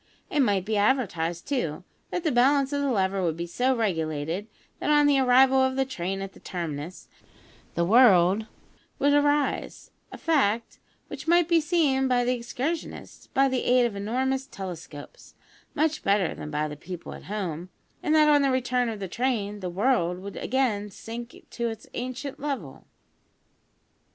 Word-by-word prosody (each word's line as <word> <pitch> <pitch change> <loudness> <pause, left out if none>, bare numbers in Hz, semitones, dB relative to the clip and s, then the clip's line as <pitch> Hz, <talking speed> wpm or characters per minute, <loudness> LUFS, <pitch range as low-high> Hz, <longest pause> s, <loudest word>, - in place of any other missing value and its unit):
It 300 - 0
might 200 -8 +2
be 215 0 0
advertised, 180 -8 0
too, 185 - -2 0.3
that 355 - -3
the 315 - +1
balance 275 +3 +3
of 285 - 0
the 280 - 0
lever 195 -4 +1
would 165 -3 -1
be 170 - -3
so 250 +9 0
regulated, 165 -3 -2 0.3
that, - - -2
on 295 0 +5
the 285 -1 +4
arrival 265 +1 +5
of 260 0 +1
the 270 0 +1
train 195 -5 -4
at 195 - -8
the - - -16
terminus, 165 -1 -6 0.7
the 170 - +1
world 205 -2 +5 0.5
would 285 +1 +3
rise 290 0 0 0.2
(a - - -8
fact 235 -9 0 0.3
which - - -8
might 345 0 +4
be 335 -1 +4
seen 300 -5 +2
by 245 -1 +2
the 250 - +2
excursionists, 255 +7 -5
by 270 +1 +2
the 260 -2 -1
aid 250 0 +4
of 230 -4 -2
enormous 260 +6 -1
telescopes, 175 - -9 0.4
much 310 +1 +1
better 195 -3 +1
than 150 - -7
by 150 0 -1
the 150 - -7
people 175 +3 -8
at - - -11
home), 180 -4 -4 0.3
and 310 - +1
that, 305 -1 +6
on 295 -1 +5
the 275 - +2
return 250 -1 +1
of 220 -2 -5
the 195 - -4
train, 210 -1 -2
the 185 -2 -4
world 180 -2 +1
would 200 +2 -8
again 225 -5 0
sink 230 +4 -8 0.2
to 235 -1 -2
its 225 -1 -8
ancient 255 +3 -5
level. 255 - -5
235 Hz, 170 wpm, -26 LUFS, 185-270 Hz, 0.7 s, that